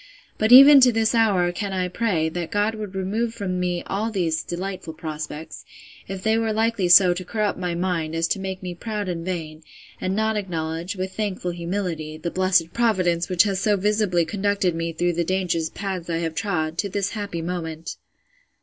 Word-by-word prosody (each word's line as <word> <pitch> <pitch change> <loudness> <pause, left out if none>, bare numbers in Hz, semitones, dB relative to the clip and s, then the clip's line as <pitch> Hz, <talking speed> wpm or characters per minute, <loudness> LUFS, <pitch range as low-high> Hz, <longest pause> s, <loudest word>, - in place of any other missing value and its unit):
But 220 +2 +2
even 275 +3 +10
to 250 -1 +6
this 225 0 +1
hour 200 -6 +3
can 195 +2 -4
I 185 -1 0
pray, 180 -4 0
that 170 0 -4
God 205 +3 +1
would 210 -3 -7
remove 220 +5 -2
from 185 -4 -3
me 180 -1 -1
all 210 +3 -2
these 170 -7 -1
delightful 180 -2 -5
prospects, 155 0 -7 0.4
if 190 -1 -6
they 220 +1 +2
were 225 -1 0
likely 220 -3 +1
so 180 0 +7
to 180 +1 -5
corrupt 210 +1 -2
my 180 -2 -2
mind, 170 -3 -2
as 165 0 +1
to - - 0
make 190 -1 -5
me 180 -1 -4
proud 210 +2 -4
and 170 -2 -3
vain, 160 -4 -5 0.4
and 185 +1 -1
not 220 0 0
acknowledge, 170 -1 -3
with 185 0 -4
thankful 195 -4 -2
humility, 170 -3 -4
the 170 +2 -4
blessed 185 -3 +2
Providence 185 -7 +1
which 180 -2 +5
has 195 -3 -1
so 205 0 +2
visibly 200 -3 +1
conducted 200 0 0
me 165 0 -3
through 175 +2 0
the 170 +1 0
dangerous 170 -3 -1
paths 185 -3 -5
I 165 - 0
have 165 -1 -2
trod, 160 -4 -2
to 200 - 0
this 200 +1 -2
happy 200 -6 -4
moment. 165 -2 -5
185 Hz, 195 wpm, -23 LUFS, 170-205 Hz, 0.4 s, even